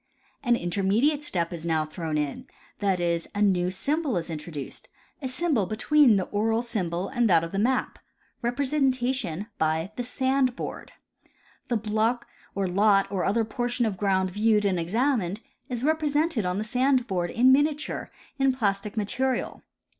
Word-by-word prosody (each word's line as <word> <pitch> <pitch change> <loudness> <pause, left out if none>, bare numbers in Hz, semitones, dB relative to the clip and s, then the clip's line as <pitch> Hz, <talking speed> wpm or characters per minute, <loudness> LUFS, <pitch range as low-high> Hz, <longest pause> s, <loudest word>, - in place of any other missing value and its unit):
An 240 -3 +3
intermediate 210 - +1
step 175 - -1
is 165 -2 -6
now 160 -2 +1
thrown 155 -1 -4
in, 150 -2 -3 0.3
that 195 -3 +1
is, 170 -1 -1
a 205 - -1
new 180 -3 +2
symbol 280 - -1
is 170 0 -4
introduced 150 -2 -7 0.2
— - - -37
a 260 - -3
symbol 260 - 0
between 250 +3 +4
the 190 - +1
oral 225 +4 0
symbol 185 -5 -2
and 240 -4 +1
that 165 -3 +5
of 165 - -5
the 195 - -2
map,— 255 +4 0 0.4
representation 255 - 0
by 160 +4 0
the 245 - -1
sand 260 0 +1
board. - - -7 0.7
The 240 - +1
block 220 +3 0 0.3
or 195 -1 0
lot 195 +2 +3
or 190 -3 -1
other 225 +3 +1
portion 240 +2 -1
of 215 -3 -1
ground 190 -1 +1
viewed 210 +1 +2
and 190 -3 +1
examined 215 +1 0 0.3
is 245 -1 -3
represented 300 - +1
on 180 +1 -1
the 210 - -1
sand 255 +3 +2
board 180 -5 -1
in 250 +6 +4
miniature 295 +2 +1 0.3
in 270 -1 +3
plastic 210 -3 -1
material. 255 +5 -1
215 Hz, 160 wpm, -26 LUFS, 185-255 Hz, 0.7 s, that